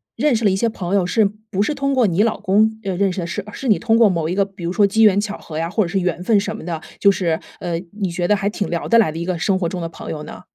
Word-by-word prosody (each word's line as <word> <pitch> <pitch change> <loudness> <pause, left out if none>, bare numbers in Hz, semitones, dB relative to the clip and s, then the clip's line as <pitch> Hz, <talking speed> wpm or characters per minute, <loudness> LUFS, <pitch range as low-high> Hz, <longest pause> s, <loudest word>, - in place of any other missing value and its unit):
认 300 -5 +2
识 225 0 -1
了 200 - +6
一 190 - +1
些 230 +4 +1
朋 190 -3 -3
友 190 -3 +2
是 215 +4 +2 0.3
不 195 - 0
是 295 +8 0
通 275 0 0
过 250 -4 +3
你 185 +3 +2
老 230 - 0
公 220 +3 +2
认 190 -3 -3
认 195 0 +2
识 180 - -5
的， 170 - -4
是 205 +3 -4
是 265 - -6
你 215 - +4
通 225 -1 +2
过 230 -3 +6
某 165 -3 -1
一 180 - -1
个 200 0 +2
比 195 -3 -12
如 170 - -1
说 200 +1 +3
机 220 +3 +1
缘 200 -2 +5
巧 210 0 -3
合 155 - -8
呀， 165 +1 -1
或 210 +4 +1
者 175 - -3
是 195 +2 0
缘 180 -1 -2
分 210 +1 +3
什 210 +2 -3
么 - - -9
的， 165 -1 -4 0.2
就 200 - +5
是， 170 -4 -1 0.2
呃， 170 -2 -2 0.2
你 190 - 0
觉 175 +1 -2
得 210 - +4
还 200 0 -1
挺 205 -1 -3
聊 170 -1 -2
得 230 - +5
来 220 -9 +4
的 160 - -6
一 170 - -3
个 180 -1 -2
生 190 +2 +1
活 175 - 0
中 175 +1 -4
的 165 - -4
朋 - - -9
友 150 -1 -5
呢？ - - -10
195 Hz, 365 characters per minute, -20 LUFS, 175-215 Hz, 0.3 s, 了